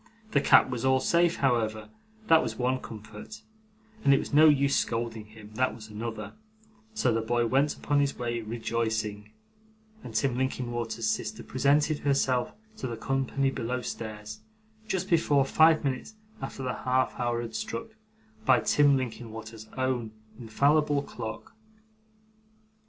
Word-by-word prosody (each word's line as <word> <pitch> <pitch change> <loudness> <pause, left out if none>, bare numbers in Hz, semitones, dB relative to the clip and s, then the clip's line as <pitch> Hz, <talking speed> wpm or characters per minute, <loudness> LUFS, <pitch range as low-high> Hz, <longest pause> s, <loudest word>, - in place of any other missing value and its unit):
The 140 - +3
cap - - +6
was 120 -2 -4
all 130 0 +4
safe, 170 +4 +2
however 110 -5 0 0.4
that 165 -3 +6
was - - -4
one 130 +1 0
comfort 110 - -10 0.6
and 140 - +6
it - - +3
was - - -5
no 155 +2 +8
use 140 -1 +3
scolding 115 -2 -2
him 110 -1 -14
that 130 +3 0
was 110 -1 -11
another; 110 +2 -6 0.6
so 125 - +2
the 115 - 0
boy 120 +1 +1
went 135 +5 +2
upon 145 -1 +1
his 140 -1 0
way 120 -1 -2
rejoicing, 110 -2 -3 0.7
and 110 - -9
Tim 120 +3 +1
Linkinwater's 120 -3 -2
sister - - -2
presented 145 +2 +2
herself 135 -3 +1 0.3
to 130 - -4
the 115 -2 -5
company 135 +2 0
below 125 0 -3
stairs, 110 -2 -6 0.5
just 190 -2 -1 0.4
five 160 +2 +5
minutes 140 +10 -3 0.3
after 135 0 -6
the 125 - -1
half 130 0 0
hour 120 -1 0
had 115 - -7
struck 225 +1 -4 0.5
by 130 -2 +5
Tim 145 -2 +4
Linkinwater's 110 -2 -7
own 125 -4 -1 0.3
infallible 140 +5 +2
clock. 110 -5 -7
125 Hz, 140 wpm, -28 LUFS, 110-140 Hz, 0.7 s, no